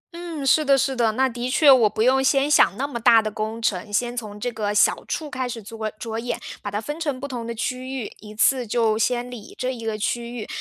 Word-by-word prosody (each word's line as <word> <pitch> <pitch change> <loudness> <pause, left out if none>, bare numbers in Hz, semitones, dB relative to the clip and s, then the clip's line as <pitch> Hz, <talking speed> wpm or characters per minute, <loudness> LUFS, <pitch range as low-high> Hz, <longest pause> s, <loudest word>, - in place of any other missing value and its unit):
嗯， 335 -5 -6
是 310 +3 +4
的 275 -2 +4
是 270 0 0
的。 230 -3 +2
那 265 +4 +2
的 245 0 -4
确 280 +2 +6
我 240 -5 +6
不 215 - -1
用 265 +2 +4
先 275 +1 +3
想 250 -8 +4
那 275 - -1
么 275 -4 -5
大 230 0 +6
的 215 -1 -2
工 215 +2 -4
程， 210 -2 -2
先 240 +3 0
从 210 -4 -6
这 245 +3 -2
个 215 -2 -2
小 210 - +3
处 310 - -3
开 260 -3 -3
始 230 -2 -6
着 220 +1 -5
着 225 0 -4
眼， 240 +1 -3 0.2
把 205 - -4
它 205 +1 -2
分 295 +8 -6
成 290 -6 -2
不 280 - -5
同 240 -4 -5
的 235 - -4
区 255 +3 -3
域， 225 - -6
一 210 0 -12
次 245 +3 +2
就 225 0 +2
先 245 +2 0
理 225 -4 -10
这 255 +1 -2
一 235 -2 -8
个 220 -1 -2
区 235 +3 -3
域， 215 - -6
240 Hz, 275 characters per minute, -23 LUFS, 220-265 Hz, 0.2 s, 确